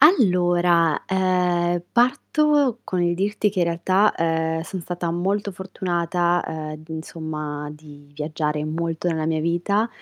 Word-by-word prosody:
Allora, 175 - +4
ehm 185 -1 +2 0.4
parto 275 +1 +2
con 180 -2 -1
il 175 0 +2
dirti 205 +3 0
che 195 -2 -2
in - - +4
realtà, 185 +5 +2
ehm, 160 0 0
son 185 +3 -6
stata 175 0 -3
molto 195 +4 -1
fortunata, 175 -2 -1
ehm, 155 -1 -6
insomma, 155 -2 -5
di 145 -1 -15
viaggiare 150 0 -2
molto 165 +2 -2
nella 160 -2 -1
mia 160 0 0
vita 175 +7 +1
175 Hz, 130 wpm, -23 LUFS, 160-190 Hz, 0.4 s, Allora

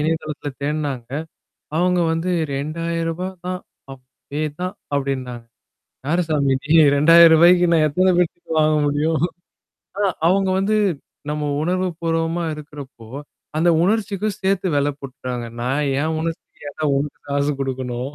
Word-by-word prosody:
இணையதளத்தில 155 -1 -2
தேடுனாங்க. 145 -5 -2 0.7
அவுங்க 180 +1 +2
வந்து 165 +3 -1 0.2
ரூ.2000 165 +4 -2 0.2
தான் 185 0 -2 0.3
அதுவே 135 +3 -8 0.2
தான் 185 0 -3 0.2
அப்டின்னாங்க. 130 -4 -3 0.6
யாருசாமி 155 -4 +1
நீ 155 +2 +2 0.2
ரூ.2000க்கு 170 +3 +7
நான் 160 -2 +4
எத்தனை 185 +5 +2
பேருக்கு 175 -1 -1
வாங்க 155 0 +3
முடியும்? 150 +2 +1 0.8
ஆ - - +2 0.2
அவுங்க 190 +2 +3
வந்து 205 +3 +1 0.5
நம்ம 150 0 -2 0.2
உணர்வு 185 +3 0
பூர்வமா 165 +1 -1
இருக்கறப்போ, 145 -6 -11 0.5
அந்த 165 +3 +3
உணர்ச்சிக்கும் 205 +1 0
சேர்த்து 190 0 +1
வெல 145 0 +2
போட்டுடாங்க. 125 -3 -6 0.2
நான் 135 +4 0 0.2
என் 160 +1 -1
உணர்ச்சிக்கு 165 -2 -6
ஏண்டா 155 +2 -5
உனக்கு 145 +1 -3
காசு 140 +1 +1
குடுக்கணும். 130 -1 -3
155 Hz, 120 wpm, -21 LUFS, 140-175 Hz, 0.8 s, ரூ.2000க்கு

